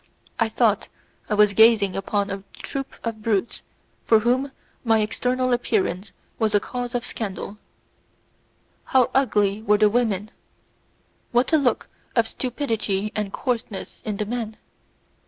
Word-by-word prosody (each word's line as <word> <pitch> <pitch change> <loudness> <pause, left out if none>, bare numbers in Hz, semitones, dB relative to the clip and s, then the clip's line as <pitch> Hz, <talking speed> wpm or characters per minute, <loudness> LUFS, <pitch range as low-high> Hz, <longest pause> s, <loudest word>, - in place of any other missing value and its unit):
I - - +2
thought - - +2 0.4
I 210 - +1
was 210 -1 +5
gazing 220 -2 +5
upon 200 +1 -1
a 195 0 -5
troop 270 -1 -6
of 225 -2 -4
brutes 215 0 0 0.4
for 225 -1 +4
whom 255 +4 +1 0.3
my 225 -2 +4
external 250 +4 0
appearance 200 -5 0 0.3
was 215 -2 +2
a - - +6
cause 245 +3 -5
of 245 - -1
scandal. 205 -1 -5 1.3
How 255 -2 +3
ugly 210 -6 +2
were 210 -1 +3
the 210 0 +4
women! 215 -3 0 1.0
What 245 +6 +2
a - - +7
look 250 -6 +1 0.3
of 230 -2 +3
stupidity 225 -6 -2
and 210 -2 -2
coarseness 230 -6 -4
in 210 -2 -3
the 210 - -1
men! 220 -1 -4
220 Hz, 135 wpm, -23 LUFS, 205-245 Hz, 1.3 s, a